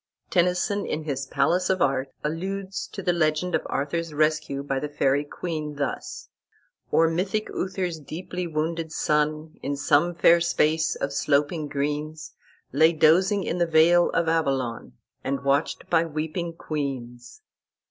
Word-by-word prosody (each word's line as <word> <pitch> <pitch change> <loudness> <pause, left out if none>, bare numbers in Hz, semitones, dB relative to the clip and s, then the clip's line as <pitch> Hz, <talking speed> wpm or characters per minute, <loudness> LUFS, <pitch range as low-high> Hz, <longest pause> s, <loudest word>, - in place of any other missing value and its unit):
Tennyson, 180 +3 +1
in 155 - -3
his 135 -3 -3
"Palace 170 +7 +1
of 190 -1 +2
Art," 135 -1 +1
alludes 190 +5 -3
to 195 - -8
the 175 - +2
legend 170 +1 +1
of - - +2
Arthur's 155 +2 -2
rescue 155 -2 +1
by 135 -1 -1
the 150 - -4
Faery 145 -1 +1
queen, 155 -1 -5
thus: 140 0 -4 0.6
"Or 165 - +4
mythic 190 +6 -1
Uther's 185 -3 -3
deeply 180 +4 -5
wounded 160 +1 -2
son, 155 0 0
In 140 +1 -2
some 155 +4 +2
fair 170 0 +5
space 160 -2 +2
of 140 0 -3
sloping 150 +2 +1
greens, 150 +2 -3 0.4
Lay 160 +4 +5
dozing 185 +6 +4
in 175 - -2
the 170 - +2
vale 165 +2 +5
of 165 - 0
Avalon, 135 - -1 0.3
And 135 +1 -2
watched 140 +3 0
by 165 -1 +3
weeping 160 +2 -3
queens." 130 -7 -5
155 Hz, 145 wpm, -25 LUFS, 145-170 Hz, 0.6 s, fair